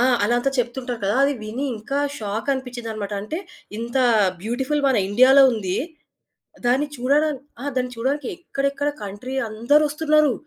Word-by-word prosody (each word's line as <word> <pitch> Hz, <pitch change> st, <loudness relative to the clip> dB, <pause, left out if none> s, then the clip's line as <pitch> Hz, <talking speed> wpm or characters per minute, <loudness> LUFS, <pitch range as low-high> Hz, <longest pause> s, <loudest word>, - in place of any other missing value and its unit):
ఆ! -, -, +4 dB, 0.2 s
అలంతా 240 Hz, +5 st, +1 dB
చెప్తుంటారు 245 Hz, 0 st, -2 dB
కదా! 205 Hz, -, +1 dB
అది 280 Hz, 0 st, +2 dB
విని 230 Hz, +6 st, -4 dB
ఇంకా 275 Hz, +7 st, -3 dB, 0.2 s
షాకనిపించిందనమాట. 225 Hz, -1 st, -3 dB
అంటే, 310 Hz, +11 st, -4 dB, 0.4 s
ఇంతా 240 Hz, +3 st, 0 dB, 0.4 s
బ్యూటిఫుల్ 265 Hz, +6 st, -1 dB
మన 265 Hz, -, +2 dB
ఇండియాలో 255 Hz, +6 st, +7 dB
ఉంది. 190 Hz, -5 st, -2 dB, 0.9 s
దాన్ని 270 Hz, +4 st, +2 dB
చూడడాన్ 285 Hz, +3 st, +2 dB, 0.2 s
ఆ! -, -, -5 dB
దాన్ని 250 Hz, 0 st, -1 dB
చూడడానికి 265 Hz, +3 st, -1 dB
ఎక్కడెక్కడ 280 Hz, -4 st, -1 dB
కంట్రీ 205 Hz, +7 st, -6 dB
అందరొస్తున్నరు. 300 Hz, +5 st, +3 dB
255 Hz, 125 wpm, -22 LUFS, 230-280 Hz, 0.9 s, ఇండియాలో